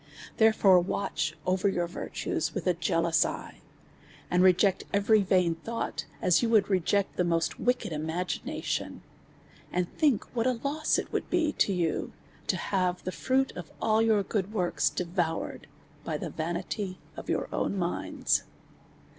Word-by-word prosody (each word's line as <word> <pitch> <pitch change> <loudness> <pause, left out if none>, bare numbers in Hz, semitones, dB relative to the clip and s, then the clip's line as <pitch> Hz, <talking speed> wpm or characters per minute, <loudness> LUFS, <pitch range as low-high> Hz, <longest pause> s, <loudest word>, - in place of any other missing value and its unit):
Therefore, 205 -5 +5
watcli 160 -5 -2
over 185 +2 +2
your 175 -2 0
virtues 170 - -3
with - - -3
a 180 - +3
jealous 165 -1 +2
eye, - - -6 0.7
and 180 - +4
reject 185 +1 +4
every 205 +2 +4
vain 180 -3 +3
thought, 225 +8 -4 0.2
as 180 -2 +4
you 235 - +1
would 210 -3 +3
re 190 - +4
ject 200 +3 0
the 180 - +3
most 165 -1 0
wicked 250 -8 0
imaginations; 160 +4 -3 0.7
and 180 0 -2
think 285 -9 +3
what 230 +1 +1
a 255 - +3
loss 300 +2 +1
it - - -4
would - - -2
be 325 -4 +2
to - - +2
you, 175 -4 -1 0.3
to - - +1
have 180 -2 -1
the 185 - -3
fruit 265 +6 +1
of 175 -4 -7
all 220 0 +3
your 220 -3 +3
good 200 0 -2
works 180 -5 +1
devoured 175 -2 -2 0.4
by - - -2
the - - -5
vanity 180 +4 -3 0.2
of - - -8
your - - 0
own 200 - -1
minds. 175 -1 0
185 Hz, 155 wpm, -29 LUFS, 175-215 Hz, 0.7 s, Therefore